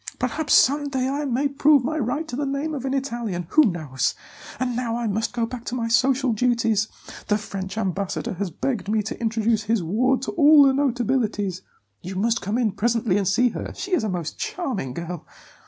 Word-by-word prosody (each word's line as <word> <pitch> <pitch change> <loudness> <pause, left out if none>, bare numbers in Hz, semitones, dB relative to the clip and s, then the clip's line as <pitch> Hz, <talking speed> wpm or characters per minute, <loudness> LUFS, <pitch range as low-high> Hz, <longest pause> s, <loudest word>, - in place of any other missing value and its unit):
Perhaps 315 -1 +1
some 285 +1 +4
day 260 -2 -1
I 285 +2 -2
may 270 +2 +1
prove 280 0 +4
my 310 +3 -1
right 285 +6 -2
to 245 - -5
the 290 - -2
name 280 +3 -2
of 270 -3 -4
an 265 - -1
Italian 235 -9 -3
who 310 - +6
knows? 155 - -1 0.4
And 250 -1 -1
now 235 -2 -1
I 240 0 -2
must 220 +1 -1
go 235 -1 -1
back 240 0 -7
to 245 - -3
my 230 -2 -1
social 260 +1 +3
duties; 230 -2 +1 0.4
the 210 - +2
French 195 -1 -6
ambassador 195 -2 -2
has 190 +1 -3
begged 205 - -3
me 215 0 +1
to 220 - -6
introduce 225 -1 0
his 220 -3 +1
ward 250 +10 +1
to - - -2
all 300 -2 +7
the 270 -1 +5
notabilities; 235 -8 0 0.4
you 185 +2 -7
must 230 +4 +1
come 205 +4 -1
in 235 -4 +1
presently 220 -1 0
and 200 -2 +1
see 245 +6 +3
her. - - -6
She 380 0 -5
is 355 - +2
a 215 - -1
most 175 -4 -4
charming 235 - -3
girl. 170 -1 -5
235 Hz, 205 wpm, -23 LUFS, 205-265 Hz, 0.4 s, all